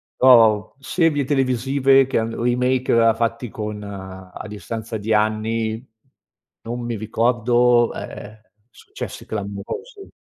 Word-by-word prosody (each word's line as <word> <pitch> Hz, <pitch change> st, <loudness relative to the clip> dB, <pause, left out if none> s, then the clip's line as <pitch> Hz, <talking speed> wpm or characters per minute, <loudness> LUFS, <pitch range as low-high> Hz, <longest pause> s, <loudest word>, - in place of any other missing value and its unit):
però 115 Hz, -4 st, +6 dB
u 105 Hz, -, -14 dB
serie 155 Hz, -1 st, +1 dB
televisive 135 Hz, 0 st, +3 dB
che 135 Hz, -2 st, 0 dB
hanno 115 Hz, +1 st, -3 dB
remake 125 Hz, +1 st, +1 dB
a 115 Hz, -1 st, +4 dB
fatti 115 Hz, +1 st, -2 dB
con 105 Hz, -1 st, -5 dB
a 95 Hz, -1 st, -9 dB
distanza 110 Hz, +2 st, -6 dB
di 105 Hz, +2 st, -4 dB
anni, 110 Hz, +2 st, 0 dB, 0.8 s
non 120 Hz, +1 st, -5 dB
mi 120 Hz, -2 st, -3 dB
ricordo, 120 Hz, +2 st, +2 dB
ehm, 105 Hz, +1 st, -9 dB, 0.3 s
successi -, -, -9 dB
clamorosi. 110 Hz, -, -6 dB
115 Hz, 115 wpm, -21 LUFS, 110-125 Hz, 0.8 s, però